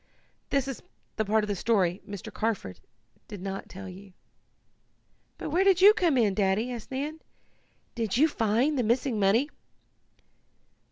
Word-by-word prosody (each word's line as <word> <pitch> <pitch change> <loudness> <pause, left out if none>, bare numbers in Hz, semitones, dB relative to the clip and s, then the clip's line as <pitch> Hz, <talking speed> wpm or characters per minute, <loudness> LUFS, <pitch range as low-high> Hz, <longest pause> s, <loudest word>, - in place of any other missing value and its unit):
That 275 -1 +1
is 270 - -5 0.4
the 220 - 0
part 215 +1 +2
of - - -3
the 205 - -1
story 190 -3 +1
Mr. 200 -3 -7
Carford 210 - -3 0.5
did 205 -3 -8
not 195 +1 -6
tell 195 +1 -9
you." 190 +1 -12 1.2
"But - - -5
where 355 +5 +3
do 390 -1 +5
you 420 - +10
come 345 -10 +2
in, 215 -5 +3
Daddy?" 200 +5 +1
asked 235 -3 -7
Nan. 290 +4 -4 0.7
"Did 230 -2 -1
you 305 +4 +5
find 255 +2 +1
the - - +2
missing 235 +1 0
money?" 220 +9 +3
225 Hz, 155 wpm, -28 LUFS, 200-270 Hz, 1.2 s, you